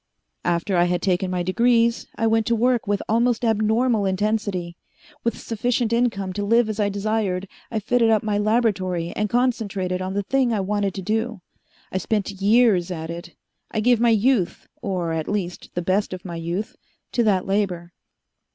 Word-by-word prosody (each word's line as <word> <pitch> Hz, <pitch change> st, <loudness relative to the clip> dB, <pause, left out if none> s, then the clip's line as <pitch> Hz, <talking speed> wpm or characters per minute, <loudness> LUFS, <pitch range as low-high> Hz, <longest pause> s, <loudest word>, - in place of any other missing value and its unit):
"After 175 Hz, +2 st, +1 dB
I 175 Hz, -, +4 dB
had 175 Hz, 0 st, 0 dB
taken 185 Hz, 0 st, +1 dB
my 180 Hz, -1 st, -1 dB
degrees, 235 Hz, +4 st, +2 dB
I 225 Hz, -, -1 dB
went 225 Hz, -1 st, +2 dB
to 235 Hz, -, +3 dB
work 240 Hz, 0 st, +1 dB
with 205 Hz, -1 st, 0 dB
almost 235 Hz, +1 st, +2 dB
abnormal 220 Hz, 0 st, +2 dB
intensity. 190 Hz, -3 st, -1 dB, 0.5 s
With 235 Hz, -, -1 dB
sufficient 235 Hz, +1 st, -1 dB
income 220 Hz, -6 st, 0 dB
to 205 Hz, -, -3 dB
live 230 Hz, +2 st, +3 dB
as 215 Hz, 0 st, -4 dB
I 205 Hz, -1 st, +2 dB
desired, 200 Hz, -2 st, -1 dB, 0.2 s
I 225 Hz, -, -3 dB
fitted 230 Hz, +2 st, +2 dB
up 220 Hz, -2 st, +3 dB
my 210 Hz, -1 st, 0 dB
laboratory 200 Hz, -6 st, 0 dB
and 210 Hz, 0 st, -1 dB
concentrated 205 Hz, -7 st, 0 dB
on 190 Hz, +1 st, -3 dB
the 205 Hz, -, 0 dB
thing 260 Hz, +2 st, +1 dB
I 215 Hz, -, 0 dB
wanted 200 Hz, 0 st, -1 dB
to 190 Hz, -, -5 dB
do. 220 Hz, +1 st, -1 dB, 0.5 s
I 190 Hz, -, -1 dB
spent 205 Hz, +1 st, -1 dB
years 205 Hz, -4 st, +4 dB
at 165 Hz, -2 st, -5 dB
it. 170 Hz, -1 st, -8 dB, 0.3 s
I 215 Hz, -, -2 dB
gave 240 Hz, +1 st, +3 dB
my 235 Hz, 0 st, +4 dB
youth 225 Hz, -3 st, +1 dB
or, 180 Hz, -4 st, -2 dB
at 160 Hz, -1 st, -2 dB
least, 185 Hz, -4 st, -3 dB
the 175 Hz, -, -1 dB
best 190 Hz, +2 st, 0 dB
of 185 Hz, 0 st, -8 dB
my 170 Hz, -2 st, -5 dB
youth 170 Hz, +6 st, -4 dB, 0.4 s
to 240 Hz, -, +1 dB
that 190 Hz, -4 st, +2 dB
labor. 185 Hz, -4 st, -1 dB
205 Hz, 180 wpm, -23 LUFS, 185-225 Hz, 0.5 s, I